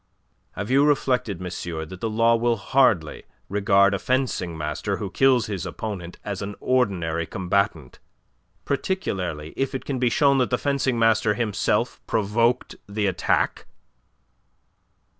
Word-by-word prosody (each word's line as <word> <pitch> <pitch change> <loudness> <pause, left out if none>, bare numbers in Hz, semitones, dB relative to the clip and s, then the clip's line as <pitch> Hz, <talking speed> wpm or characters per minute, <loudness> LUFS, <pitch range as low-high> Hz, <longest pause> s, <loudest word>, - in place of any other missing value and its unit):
"Have 100 +4 -5
you 135 +2 +5
reflected, 125 - +1
monsieur, 85 -3 -5
that 95 +3 -11
the 115 - -1
law 115 +2 +3
will 120 0 +1
hardly 100 - +2 0.3
regard 100 0 +3
a 100 - -1
fencing 125 -10 -1
master 75 0 -3
who - - -5
kills 130 -4 +3
his 100 -4 -4
opponent 95 -6 -6
as 100 -1 -4
an 100 0 -5
ordinary 90 -10 0
combatant, 90 -7 -1 0.7
particularly 95 - -2
if 135 0 -2
it 130 - -5
can 135 -3 -2
be 125 -1 +3
shown 140 +2 +3
that 125 - +1
the 125 - +1
fencing 135 -3 0
master 115 -2 +3
himself 105 -3 0
provoked 115 +4 +1
the 105 0 -1
attack?" 95 -3 0
105 Hz, 140 wpm, -24 LUFS, 95-125 Hz, 0.7 s, you